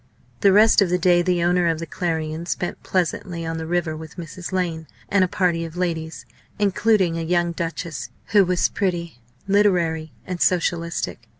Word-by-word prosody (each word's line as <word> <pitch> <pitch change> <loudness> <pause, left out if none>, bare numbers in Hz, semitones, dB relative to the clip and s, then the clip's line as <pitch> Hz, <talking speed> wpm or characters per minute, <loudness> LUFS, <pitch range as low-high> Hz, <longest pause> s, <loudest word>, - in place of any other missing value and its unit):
The 200 - +5
rest 215 +2 +6
of 195 - +3
the 180 - +2
day 175 0 +4
the 175 -1 +1
owner 175 0 +2
of 165 -1 +1
the 165 - -5
Clarion 160 0 -3
spent 175 - -3
pleasantly 175 -1 -2
on 165 0 -3
the 160 - -5
river 170 -2 -1
with 155 -1 -10
Mrs. 175 +2 -7
Lane 170 -4 -2 0.2
and 200 -2 +4
a - - +2
party 175 -2 0
of 165 +1 -8
ladies, 165 -3 -3 0.3
including 205 -4 +2
a - - -2
young 175 +1 +1
Duchess, 165 -6 -4 0.2
who 205 -1 +6
was 180 -1 +2
pretty, 170 - -2 0.3
literary, 175 -6 +2
and 180 -2 -5
socialistic. 170 -2 0
175 Hz, 175 wpm, -22 LUFS, 165-185 Hz, 0.3 s, rest